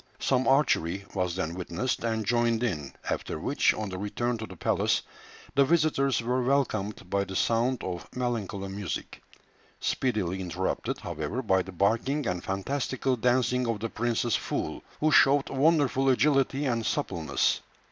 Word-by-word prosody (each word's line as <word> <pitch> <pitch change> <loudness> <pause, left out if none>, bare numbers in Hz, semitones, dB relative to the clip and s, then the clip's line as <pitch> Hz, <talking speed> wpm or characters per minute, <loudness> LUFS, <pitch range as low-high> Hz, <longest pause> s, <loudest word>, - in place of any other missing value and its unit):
Some 130 -1 +1
archery 100 - +2
was 90 -3 -1
then 85 -3 -2
witnessed, 90 +9 -2
and 110 -2 -1
joined 120 +1 +2
in, 75 - -2
after - - -2
which, - - +2
on 110 -2 -4
the 95 -1 -5
return 120 +4 -1
to 110 - -5
the 95 - -10
palace, - - +1 0.5
the 140 - +5
visitors 140 -4 +2
were 125 +2 +1
welcomed 110 -8 0
by 100 +2 +1
the 95 0 -7
sound 120 +5 +1
of 90 -1 -5
melancholy 110 -6 -2
music, 100 -1 -5 0.6
speedily 95 -8 -1
interrupted, 90 +1 -2
however, 85 - -4
by 95 -4 +3
the 95 - -8
barking 115 - +1
and 90 -3 -2
fantastical 130 +6 -1
dancing 125 +1 +2
of 115 -2 -1
the 115 +2 -3
prince's 120 -1 0
fool, - - -3 0.2
who 155 +1 +2
showed 140 -1 +5
wonderful 140 -2 +3
agility 135 +1 +2
and 120 -3 0
suppleness. - - 0
115 Hz, 150 wpm, -28 LUFS, 95-130 Hz, 0.6 s, the